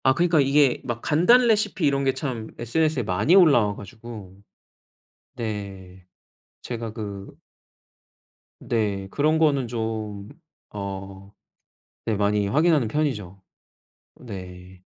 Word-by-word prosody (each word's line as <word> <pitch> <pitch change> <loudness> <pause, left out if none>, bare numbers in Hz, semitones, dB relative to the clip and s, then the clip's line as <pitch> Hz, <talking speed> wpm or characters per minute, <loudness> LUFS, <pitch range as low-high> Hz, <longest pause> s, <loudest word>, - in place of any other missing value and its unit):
아 130 - +5
그니까 170 -1 +3
이게 140 -1 +3
막 120 -2 -4
간단 235 +11 +4
레시피 210 -6 +1
이런 140 -1 +2
게 135 -1 +2
참 130 -5 -4
SNS에 150 +3 0
많이 105 - +2
올라와 140 - +5
가지고 110 -3 -10 1.0
네. 100 -5 -6 0.6
제가 115 -2 -5
그 100 -3 -7 1.3
네. 100 -4 -1
그런 155 +7 +1
거는 140 -5 +2
좀 110 -3 -4 0.4
어 100 -1 -7 0.8
네 110 - +1
많이 105 0 +1
확인하는 150 +2 +3
편이죠. 105 -9 -2 0.8
네. 90 -4 -10
115 Hz, 200 characters per minute, -24 LUFS, 100-145 Hz, 1.3 s, 아